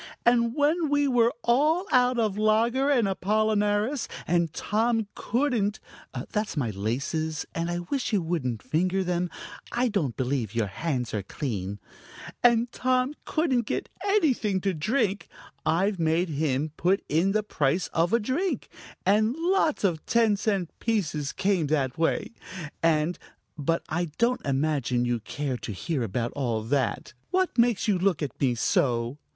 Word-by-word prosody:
"And 235 Hz, 0 st, +3 dB
when 305 Hz, +2 st, +2 dB
we 290 Hz, 0 st, +2 dB
were 240 Hz, -3 st, +4 dB
all 300 Hz, +9 st, +3 dB
out 250 Hz, 0 st, +4 dB
of 215 Hz, -4 st, +1 dB
lager 230 Hz, +6 st, +2 dB
and 245 Hz, -7 st, +3 dB
apollinaris, 210 Hz, +5 st, +1 dB, 0.2 s
and 170 Hz, -1 st, +1 dB
Tom 225 Hz, +4 st, 0 dB
couldn't 230 Hz, -4 st, 0 dB, 0.5 s
that's 210 Hz, -6 st, -2 dB
my 120 Hz, -6 st, 0 dB
laces, 140 Hz, -, -2 dB
and 165 Hz, +1 st, -2 dB
I 175 Hz, 0 st, -2 dB
wish 275 Hz, -3 st, -1 dB
you 210 Hz, -, +3 dB
wouldn't 150 Hz, -, -2 dB
finger 185 Hz, +4 st, +1 dB
them; 180 Hz, 0 st, -1 dB, 0.4 s
I 245 Hz, +1 st, +1 dB
don't 155 Hz, -, -1 dB
believe 125 Hz, -4 st, -1 dB
your 115 Hz, -2 st, +2 dB
hands 125 Hz, +3 st, -3 dB
are 105 Hz, -, -1 dB
clean 100 Hz, -3 st, -4 dB, 0.6 s
and 235 Hz, 0 st, +4 dB
Tom 255 Hz, +2 st, +1 dB
couldn't 260 Hz, -8 st, +1 dB
get -, -, -2 dB
anything 295 Hz, -, +2 dB
to 195 Hz, 0 st, 0 dB
drink, 200 Hz, -, 0 dB, 0.4 s
I've 190 Hz, +3 st, +1 dB
made 165 Hz, +2 st, +1 dB
him 150 Hz, 0 st, -1 dB
put 185 Hz, +3 st, +2 dB
in 175 Hz, +6 st, +2 dB
the 215 Hz, 0 st, +1 dB
price 160 Hz, -3 st, 0 dB
of 165 Hz, +1 st, +2 dB
a 235 Hz, -, +4 dB
drink, 275 Hz, -, -1 dB, 0.4 s
and 215 Hz, +5 st, +3 dB
lots 335 Hz, -, +1 dB
of 170 Hz, -6 st, +1 dB
ten 225 Hz, -3 st, +3 dB
cent 195 Hz, -4 st, -1 dB
pieces 155 Hz, -11 st, -1 dB
came 185 Hz, -5 st, +1 dB
that 140 Hz, -2 st, 0 dB
way, 165 Hz, -, 0 dB, 0.5 s
and 165 Hz, +1 st, +2 dB, 0.4 s
But 160 Hz, +3 st, -1 dB
I 170 Hz, +2 st, -1 dB
don't 240 Hz, +2 st, +1 dB
imagine 135 Hz, -3 st, +1 dB
you 120 Hz, -1 st, 0 dB
care 135 Hz, +3 st, -3 dB
to 115 Hz, -, -6 dB
hear 140 Hz, -, -2 dB
about 115 Hz, +2 st, -2 dB
all 120 Hz, -6 st, -2 dB
that. 125 Hz, -2 st, -1 dB, 0.2 s
What 370 Hz, 0 st, +1 dB
makes 235 Hz, -3 st, +3 dB
you 200 Hz, -4 st, +2 dB
look 180 Hz, -4 st, +1 dB
at 140 Hz, -, -6 dB
me 130 Hz, -3 st, +2 dB
so?" 120 Hz, +2 st, +1 dB
190 Hz, 155 wpm, -27 LUFS, 145-235 Hz, 0.6 s, were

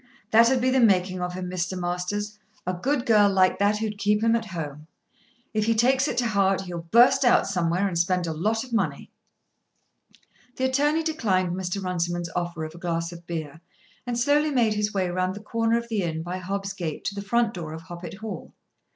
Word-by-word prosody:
"That'd 235 Hz, +3 st, +5 dB
be 255 Hz, +1 st, +2 dB
the 265 Hz, -, +3 dB
making 185 Hz, -5 st, +3 dB
of 180 Hz, 0 st, -3 dB
him, 185 Hz, 0 st, -4 dB
Mr. 185 Hz, +1 st, -3 dB
Masters; 180 Hz, +4 st, -3 dB, 0.3 s
a 185 Hz, -, -1 dB
good 250 Hz, +8 st, -1 dB
girl 210 Hz, -3 st, +5 dB
like 185 Hz, -1 st, +3 dB
that 205 Hz, +1 st, +3 dB
who'd 215 Hz, -1 st, -3 dB
keep 210 Hz, +1 st, +2 dB
him 230 Hz, 0 st, +4 dB
at 230 Hz, -1 st, -1 dB
home. 155 Hz, -6 st, -6 dB, 0.7 s
If 215 Hz, -1 st, +1 dB
he 230 Hz, 0 st, +2 dB
takes 260 Hz, +5 st, +3 dB
it 245 Hz, -, -3 dB
to 245 Hz, -, +2 dB
heart 195 Hz, -2 st, +2 dB
he'll 180 Hz, -2 st, -6 dB
burst 250 Hz, +5 st, +6 dB
out 245 Hz, -1 st, +5 dB
somewhere 180 Hz, 0 st, 0 dB
and 170 Hz, -3 st, -1 dB
spend 180 Hz, +1 st, +1 dB
a 165 Hz, -, -2 dB
lot 215 Hz, +8 st, 0 dB
of 255 Hz, -2 st, -11 dB
money." 170 Hz, -11 st, -1 dB, 1.4 s
The 260 Hz, -, 0 dB
attorney 295 Hz, +5 st, +2 dB
declined 195 Hz, -, 0 dB
Mr. 190 Hz, +1 st, -3 dB
Runciman's 175 Hz, -1 st, -2 dB
offer 175 Hz, -2 st, -2 dB
of 155 Hz, -, -8 dB
a 170 Hz, -, -12 dB
glass 170 Hz, -1 st, -2 dB
of 170 Hz, 0 st, -12 dB
beer 160 Hz, -2 st, -5 dB, 0.5 s
and 240 Hz, -1 st, -1 dB
slowly 290 Hz, +5 st, +3 dB
made 240 Hz, -6 st, +2 dB
his 210 Hz, 0 st, -1 dB
way 190 Hz, -3 st, 0 dB
round 185 Hz, +1 st, -1 dB
the -, -, -7 dB
corner 230 Hz, +2 st, 0 dB
of 235 Hz, 0 st, -4 dB
the 220 Hz, -3 st, -1 dB
inn 160 Hz, -2 st, -2 dB
by 180 Hz, +2 st, -4 dB
Hobb's 195 Hz, +1 st, -4 dB
gate 170 Hz, -6 st, -5 dB
to -, -, -1 dB
the 200 Hz, -, -5 dB
front 230 Hz, +2 st, +1 dB
door 165 Hz, -4 st, -6 dB
of 160 Hz, +1 st, -8 dB
Hoppet 175 Hz, -1 st, -8 dB
Hall. 215 Hz, -6 st, -7 dB
195 Hz, 210 wpm, -25 LUFS, 175-230 Hz, 1.4 s, burst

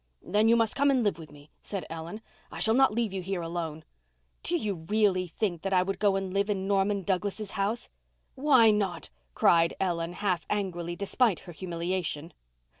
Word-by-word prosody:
"Then 215 Hz, +2 st, +2 dB
you 230 Hz, -, +6 dB
must 230 Hz, -2 st, +2 dB
come 280 Hz, +1 st, +3 dB
and 260 Hz, -3 st, +3 dB
live 200 Hz, -6 st, 0 dB
with 160 Hz, -2 st, -10 dB
me," 145 Hz, 0 st, -16 dB
said 195 Hz, -3 st, -5 dB
Ellen. 165 Hz, +6 st, -7 dB, 0.3 s
"I -, -, -8 dB
shall 220 Hz, -, +3 dB
not 265 Hz, 0 st, +5 dB
leave 225 Hz, -2 st, -1 dB
you 190 Hz, -, -3 dB
here 180 Hz, -1 st, -3 dB
alone." 165 Hz, -2 st, -4 dB, 0.6 s
"Do 345 Hz, -, 0 dB
you 195 Hz, -, -4 dB
really 205 Hz, -4 st, +2 dB
think 175 Hz, -1 st, -2 dB
that 195 Hz, 0 st, -2 dB
I 180 Hz, -1 st, +4 dB
would 195 Hz, +1 st, -3 dB
go 205 Hz, -2 st, +3 dB
and 195 Hz, -1 st, -3 dB
live 200 Hz, +1 st, +1 dB
in 190 Hz, -2 st, -1 dB
Norman 200 Hz, 0 st, +1 dB
Douglas's 200 Hz, +2 st, -2 dB
house?" 205 Hz, +4 st, -1 dB, 0.5 s
"Why 260 Hz, -5 st, +5 dB
not?" 200 Hz, -4 st, -2 dB, 0.2 s
cried 170 Hz, -1 st, +4 dB
Ellen, 170 Hz, -2 st, -1 dB
half 180 Hz, -4 st, -1 dB
angrily, 175 Hz, -4 st, -2 dB
despite 200 Hz, +2 st, +1 dB
her 175 Hz, -, -10 dB
humiliation. 170 Hz, -1 st, -3 dB
195 Hz, 190 wpm, -28 LUFS, 175-210 Hz, 0.6 s, you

